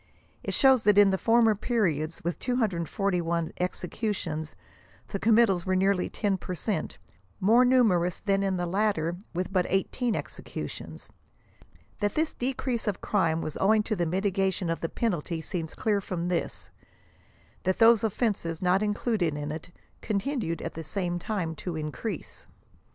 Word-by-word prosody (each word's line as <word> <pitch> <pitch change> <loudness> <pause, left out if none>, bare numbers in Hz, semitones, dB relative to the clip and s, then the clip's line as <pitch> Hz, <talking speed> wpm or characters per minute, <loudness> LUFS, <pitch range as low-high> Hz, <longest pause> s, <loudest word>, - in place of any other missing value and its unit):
It - - -2
shows 265 -4 +6
that 210 -1 +5
in 205 -1 +7
the - - +2
former 230 -1 +4
periods, 175 - -1
with 175 +1 -2
241 175 - -1
executions, 180 -3 -3 0.5
the 195 - -3
committals 215 -5 +4
were 185 - +2
nearly 190 0 +2
ten 200 -3 -1
per 180 - -5
cent, 205 +3 -3 0.4
more 225 +6 +5
numerous 215 -9 +3
than 195 -1 +1
in 195 -1 0
the 175 - -1
latter 175 -3 0 0.2
with 180 +2 -2
but 180 -2 +2
18 220 +4 0
executions. - - -6 0.9
That 205 -1 0
this 315 0 0
decrease 250 -2 -2
of 205 - -1
crime 165 -6 +1
was 155 - -4
owing 215 +2 +4
to 215 - -1
the 175 -3 0
mitigation 190 0 0
of 165 - -2
the 165 - -3
penalty 175 -7 -2
seems 160 0 -5
clear 205 -2 +1
from 175 -2 -3
this; 175 -2 -3 0.9
that 185 0 +1
those 230 -1 +6
of 220 - +1
fenses 185 -8 -1
not 185 +2 +2
included 210 -6 0
in 145 0 -4
it, 155 +2 -7 0.3
continued 215 - -2
at - - -4
the 165 - -6
same 175 +1 -2
time 175 -4 -2
to 175 -3 -4
in 155 -1 -3
crease. 225 - -6
190 Hz, 155 wpm, -28 LUFS, 170-215 Hz, 0.9 s, in